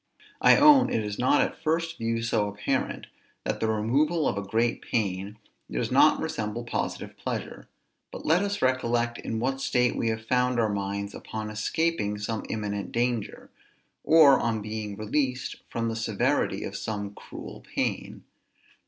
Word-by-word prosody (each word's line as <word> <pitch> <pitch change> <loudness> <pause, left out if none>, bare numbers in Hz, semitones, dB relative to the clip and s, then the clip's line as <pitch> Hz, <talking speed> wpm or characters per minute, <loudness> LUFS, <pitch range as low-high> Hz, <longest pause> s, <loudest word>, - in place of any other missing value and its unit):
I - - +7
own 290 -2 +7
it 110 - 0
is 105 -1 -5
not 130 +3 +4
at - - -2
first 165 +1 -1
view 115 0 -1
so 110 -3 +1
apparent 100 0 -2 0.4
that - - -2
the 110 - 0
removal 140 +9 +1
of - - 0
a 100 - -2
great 115 +4 0
pain 100 -2 -2 0.3
does - - -2
not - - +5
resemble 110 +3 -3
positive 120 - -4
pleasure: - - -5 0.4
but - - -8
let 165 +4 +4
us 200 -4 -2
recollect 120 -2 +1
in 110 - -3
what 135 +3 -1
state 125 -2 +2
we 115 - 0
have 110 0 -3
found 125 0 +1
our 110 -2 +1
minds 100 0 -3
upon 110 -1 -6
escaping 110 0 -1
some 105 +2 -3
imminent 105 -2 -3
danger, 120 -2 -2 0.5
or 150 -5 +7
on 115 -2 0
being 105 -1 -5
released 125 +4 -1
from 115 0 -2
the 115 - -2
severity 110 -2 0
of - - -5
some 100 -2 -4
cruel - - -10
pain. - - -2
115 Hz, 160 wpm, -27 LUFS, 105-130 Hz, 0.5 s, I